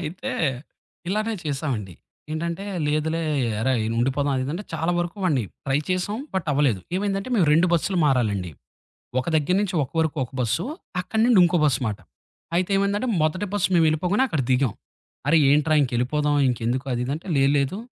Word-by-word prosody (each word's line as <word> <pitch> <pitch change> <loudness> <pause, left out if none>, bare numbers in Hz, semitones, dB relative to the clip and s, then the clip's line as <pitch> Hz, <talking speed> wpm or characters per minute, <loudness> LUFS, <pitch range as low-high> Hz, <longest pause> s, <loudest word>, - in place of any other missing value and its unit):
అయితే 180 +11 -5 0.8
ఇలానే 215 +3 0
చేసామండి. 135 - -3 0.4
ఏంటంటే, 170 +4 -3 0.2
లేదులే 155 +2 0 0.4
ఎరా! 130 +3 +1 0.3
ఉండిపోదాం 135 +3 +1
అది 130 +2 -2
అంటే 200 +3 -5
చాలా 165 +2 0
వరకు 175 +3 -2
వాడిని 140 -9 +2 0.2
ట్రై 135 +1 +1
చేశాం. 185 +4 -1 0.2
బట్ 185 -3 -1
అవ్వలేదు. 135 -9 +2 0.2
ఏమైందంటే, 195 +2 -2
మేము 175 -6 +3
2 165 +4 +5
బస్సులు 175 +2 +1
మారాలండి. 105 -9 +1 0.7
ఒక 125 - -3
దగ్గర 155 +4 +2
నుంచి 195 -3 -2
ఒక - - -9
వరకు 160 -1 0
ఒక 125 - -19
బస్సు, 120 +8 0 0.4
అక్కడి 220 +5 -1
నుండి 240 -6 +5
ఇంకో 175 0 +3
బస్సు 130 -5 +2
మాట. 105 - -4 0.6
అయితే 185 +2 0
ఏమందంటే, 200 +5 0
మొదటి 180 +6 0
బస్సు 200 -4 +2
మేము 165 -2 +5
వెళ్ళిపోగానే 180 +10 +1
అక్కడ 155 - -1
దిగాం. 125 -3 +2 0.6
అరే! 165 - +5
ఏంట్రా 150 +2 +3
ఇంకెళ్ళిపోదాం 135 +4 0
ఇంకెందుకు 125 +2 -1
అదిది 125 +3 -2
అంటే 165 - -10
"లే 135 - +4
లేదు 140 +8 0
155 Hz, 165 wpm, -24 LUFS, 135-185 Hz, 0.8 s, 2